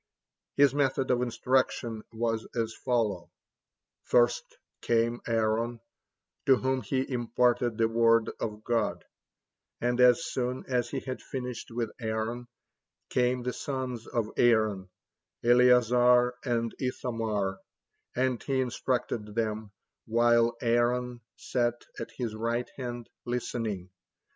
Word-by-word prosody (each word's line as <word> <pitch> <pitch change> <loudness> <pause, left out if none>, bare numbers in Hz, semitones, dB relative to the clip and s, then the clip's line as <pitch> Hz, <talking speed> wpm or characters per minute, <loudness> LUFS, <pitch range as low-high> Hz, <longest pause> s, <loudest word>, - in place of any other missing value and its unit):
His 140 -2 +5
method 135 -2 +1
of 125 -1 +2
instruction 125 -2 0
was 115 -1 -2
as 115 -1 -1
follows: 105 -8 -1 0.8
first 120 0 +2 0.2
came 115 +1 +1
Aaron, 115 +1 0 0.7
to 135 - +7
whom 130 +1 0
he 130 +4 -1
imparted 120 -1 +1
the 115 -1 +3
word 115 0 +3
of 105 -1 -4
God, 115 -3 -1 0.7
and 120 +1 +1
as 125 +6 +6
soon 125 0 -2
as 125 -2 0
he 135 - -3
had 130 -1 -5
finished 125 -3 -6
with 115 -2 -3
Aaron, 115 +2 -3 0.6
came 125 0 +1
the 125 0 -2
sons 130 -4 -4
of 115 -3 -2
Aaron, 110 -5 +3 0.5
Eleazar 125 0 +5
and 115 -3 -1
Ithamar, 110 -6 -2 0.6
and 130 -1 0
he 135 -2 -1
instructed 120 -4 -2
them, 110 -2 -2 0.4
while 115 +1 +3
Aaron 120 +1 +1
sat 120 -1 -1
at 115 - -5
his 120 -4 -2
right 115 +2 -2
hand, 120 -3 -5 0.2
listening. 115 -6 -3
120 Hz, 115 wpm, -29 LUFS, 115-125 Hz, 0.8 s, to